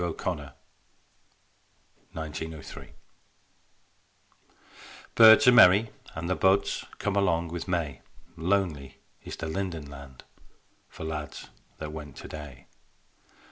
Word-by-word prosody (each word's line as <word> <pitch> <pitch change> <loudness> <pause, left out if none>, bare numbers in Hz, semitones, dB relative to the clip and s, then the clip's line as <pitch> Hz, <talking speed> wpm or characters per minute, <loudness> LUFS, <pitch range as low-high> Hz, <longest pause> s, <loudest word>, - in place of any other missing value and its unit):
O'Connor, 85 -3 -4 1.6
'03) 80 -1 -7 2.2
Birds 110 +4 +8
are - - +10
merry 105 -1 +6 0.2
and 80 +1 -4
the 90 - +1
buds 95 +2 +2
Come 105 -1 -2
along 85 -4 +1
with 85 +2 -6
May: 85 -8 -2 0.3
Lonely 80 -6 -1 0.3
is - - -7
the - - -6
linden 80 -2 -4
land 70 -2 -12 0.7
For - - -10
lads 75 -3 -6 0.3
that 75 -1 -6
went 75 -3 -8
today. 70 -4 -10
80 Hz, 100 wpm, -27 LUFS, 75-95 Hz, 2.2 s, are